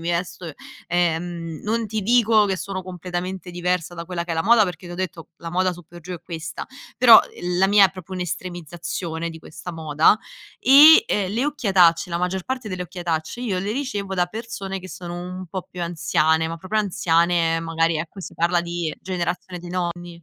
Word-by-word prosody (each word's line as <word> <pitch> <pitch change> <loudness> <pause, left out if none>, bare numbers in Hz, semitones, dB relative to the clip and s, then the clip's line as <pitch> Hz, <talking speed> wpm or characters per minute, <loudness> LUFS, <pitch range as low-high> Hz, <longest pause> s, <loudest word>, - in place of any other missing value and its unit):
vesto 170 0 -3 0.4
ehm 170 -1 -1
non 225 +1 0
ti 215 +1 -2
dico 225 -1 +4
che 190 -1 -1
sono 190 +2 -5
completamente 180 0 -5
diversa 175 0 -2
da 170 0 -6
quella 170 -2 -3
che 175 - -8
è - - -1
la 160 - 0
moda, 225 0 +5
perché 180 -1 -6
t'ho 175 - -7
detto 175 -2 -5
la 165 - -7
moda 185 +1 +1
su 175 - -12
per 175 +1 -13
giù 180 +2 -7
è 170 - -10
questa, 165 -2 -6 0.3
però 235 -2 +9 0.4
la 190 - +5
mia 200 -1 +7
è - - -10
proprio 185 0 -8
un'estremizzazione 175 -1 -4
di 160 - -10
questa 170 +3 -9
moda 160 +4 +3 0.4
e, 305 +9 +9
ehm, 195 -2 0
le 235 +5 0
occhiatacce 185 - +3
la 170 - -1
maggior 180 +1 -2
parte 255 -4 -4
delle 185 -1 -4
occhiatacce 175 +3 -4
io 195 -7 -1
le 200 +3 -2
ricevo 205 -8 -3
da 180 -1 +2
persone 200 -2 -6
che 185 - -10
sono 175 -1 -7
un 180 +1 -7
po' 185 +1 -4
più 180 - -6
anziane, 160 -1 +1
ma 165 - -5
proprio 210 +5 -1
anziane, 170 -3 +2
ehm, 165 - -3
magari 165 0 +1
ecco 170 +4 -6
si - - -8
parla 170 +1 +2
di 170 -2 -3
generazione 180 0 -3
di 175 - -9
nonni. 175 -1 -4
180 Hz, 195 wpm, -22 LUFS, 170-190 Hz, 0.4 s, però